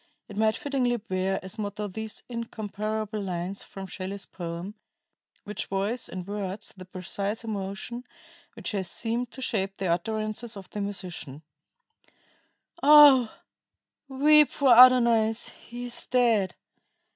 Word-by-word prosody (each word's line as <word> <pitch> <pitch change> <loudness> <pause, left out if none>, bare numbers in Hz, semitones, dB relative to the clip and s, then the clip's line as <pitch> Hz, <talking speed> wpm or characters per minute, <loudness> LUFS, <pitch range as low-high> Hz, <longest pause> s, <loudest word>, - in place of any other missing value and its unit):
It 205 - -10
might 220 +1 +2
fittingly 255 -4 0
bear 190 -3 -2
as 190 +4 -6
motto 210 0 -3
these 220 +2 -6
incomparable 215 -2 -4
lines 185 0 -4
from 195 -1 -9
Shelley's 195 +1 -5
poem, 170 +3 -6 0.7
which 210 -1 -5
voice 200 +5 -2
in 185 -1 -6
words 200 0 -5
the 185 -1 -10
precise 195 +4 -4
emotion 215 +3 -5 0.5
which - - -5
has 190 -4 -2
seemed 235 +5 -2
to 260 - -7
shape 195 -3 -1
the 195 - -3
utterances 215 +5 -2
of 190 -2 -10
the 210 - -4
musician: 180 -7 -6 1.4
"Oh, 285 -5 +8 0.8
weep 295 +2 +5
for 265 -4 +4
Adonais 235 -3 +6 0.2
he 240 +1 -6
is 240 - -5
dead! 230 -6 +2
210 Hz, 125 wpm, -27 LUFS, 195-235 Hz, 1.4 s, Oh